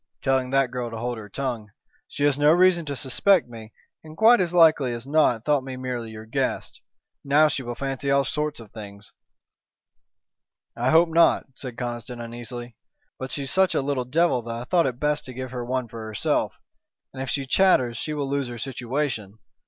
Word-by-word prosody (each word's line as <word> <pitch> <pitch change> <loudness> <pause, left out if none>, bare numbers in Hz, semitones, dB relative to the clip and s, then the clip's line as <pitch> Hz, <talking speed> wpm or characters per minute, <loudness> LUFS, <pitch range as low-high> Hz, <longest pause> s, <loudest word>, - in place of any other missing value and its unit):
"Telling 130 -2 +1
that 135 -1 +2
girl 125 -2 -3
to 115 - -7
hold 120 0 -3
her 105 -2 -10
tongue. 120 -3 -4 0.4
She 145 - -4
has 145 -1 +2
no 145 +1 +5
reason 175 -1 +4
to 140 - -3
suspect 155 +8 +2
me, 115 -2 -11 0.3
and 155 0 -12
quite 225 -1 +6
as 175 -2 0
likely 155 -7 +4
as 120 +1 -7
not 140 -6 +2
thought 145 -3 +2
me 130 -1 -7
merely 125 -3 -4
your 110 0 -9
guest. 110 - -3 0.4
Now 145 +2 +5
she 140 -2 -2
will 120 -1 -5
fancy 135 +1 -3
all 140 0 +3
sorts 150 -2 -2
of 110 -3 -13
things." 100 -1 -11 1.6
"I 120 +2 0
hope 165 +3 +5
not," 165 +1 +4
said 125 -2 -8
Conniston, 120 0 -5
uneasily, 120 0 -7 0.4
"but 130 - -5
she's 140 -2 -3
such 190 0 +3
a - - +2
little 135 -3 -1
devil 150 0 +2
that 115 0 -6
I 120 - -5
thought 170 +4 +2
it 125 -2 -4
best 150 0 0
to 130 - -9
give 130 -1 -6
her 125 -1 -4
one 125 0 -2
for 115 0 -8
herself. 110 -1 -1 0.6
And 130 - -6
if 135 - -4
she 140 -2 -1
chatters 130 -6 +3
she 150 +6 -4
will 145 -2 -2
lose 140 -1 -1
her 120 0 -7
situation. 125 -4 -3
130 Hz, 200 wpm, -24 LUFS, 120-150 Hz, 1.6 s, quite